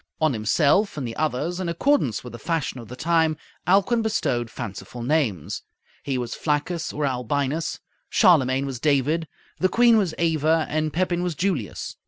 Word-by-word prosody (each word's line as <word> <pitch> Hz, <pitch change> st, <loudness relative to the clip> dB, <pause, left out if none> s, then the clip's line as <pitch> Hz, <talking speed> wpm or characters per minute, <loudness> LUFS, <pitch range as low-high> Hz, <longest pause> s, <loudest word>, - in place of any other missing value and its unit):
On 155 Hz, -3 st, +2 dB
himself 145 Hz, -, +2 dB
and 135 Hz, -4 st, -3 dB
the 115 Hz, -, -6 dB
others, 155 Hz, +4 st, -1 dB
in 180 Hz, -2 st, -2 dB
accordance 170 Hz, -, +1 dB
with 125 Hz, -2 st, -9 dB
the 120 Hz, -, -8 dB
fashion 165 Hz, -6 st, -2 dB
of 115 Hz, -, -10 dB
the 125 Hz, -, -8 dB
time, 160 Hz, +1 st, +2 dB, 0.3 s
Alcuin 200 Hz, +6 st, +3 dB
bestowed 130 Hz, -, 0 dB
fanciful 120 Hz, +2 st, -7 dB
names. 120 Hz, -, 0 dB, 0.4 s
He 135 Hz, -2 st, -2 dB
was 120 Hz, -2 st, -3 dB
Flaccus 160 Hz, +3 st, -1 dB
or 150 Hz, 0 st, -2 dB
Albinus, 140 Hz, +4 st, -1 dB, 0.3 s
Charlemagne 135 Hz, -6 st, +4 dB
was 135 Hz, -3 st, -5 dB
David, 150 Hz, +3 st, +1 dB, 0.3 s
the 185 Hz, -, +3 dB
queen 235 Hz, +1 st, +5 dB
was 180 Hz, -6 st, -1 dB
Ava, 160 Hz, -1 st, +2 dB
and 155 Hz, 0 st, 0 dB
Pepin 175 Hz, +1 st, 0 dB
was 180 Hz, -2 st, -2 dB
Julius. 175 Hz, -, -2 dB
155 Hz, 165 wpm, -24 LUFS, 130-170 Hz, 0.4 s, queen